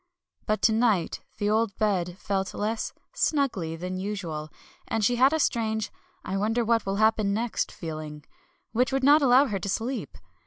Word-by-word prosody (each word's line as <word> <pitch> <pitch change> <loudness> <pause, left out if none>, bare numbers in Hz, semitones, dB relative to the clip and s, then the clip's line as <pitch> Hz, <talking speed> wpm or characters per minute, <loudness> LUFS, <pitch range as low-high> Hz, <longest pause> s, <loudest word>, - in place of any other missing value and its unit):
But 215 0 0
to - - +6
night 220 -6 +1 0.2
the 205 0 0
old 220 -2 +1
bed 185 -5 0
felt 195 -1 -2
less 220 +2 -2 0.2
"snuggly" 210 - 0
than 185 +1 -4
usual, 175 -7 -4 0.4
and 220 -2 0
she 245 +3 +2
had 260 +3 +5
a 315 - +2
strange 220 -5 0 0.3
"I 190 - -2
wonder 225 +4 +1
what 230 -2 +1
will 195 - 0
happen 215 -1 +2
next" 235 +1 -1
feeling, 155 -2 -7 0.5
which 245 +2 +1
would 270 0 0
not 290 +3 +6
allow 265 +1 +6
her 205 -7 -2
to 200 - -4
sleep. 240 +7 -3
215 Hz, 170 wpm, -27 LUFS, 190-235 Hz, 0.5 s, to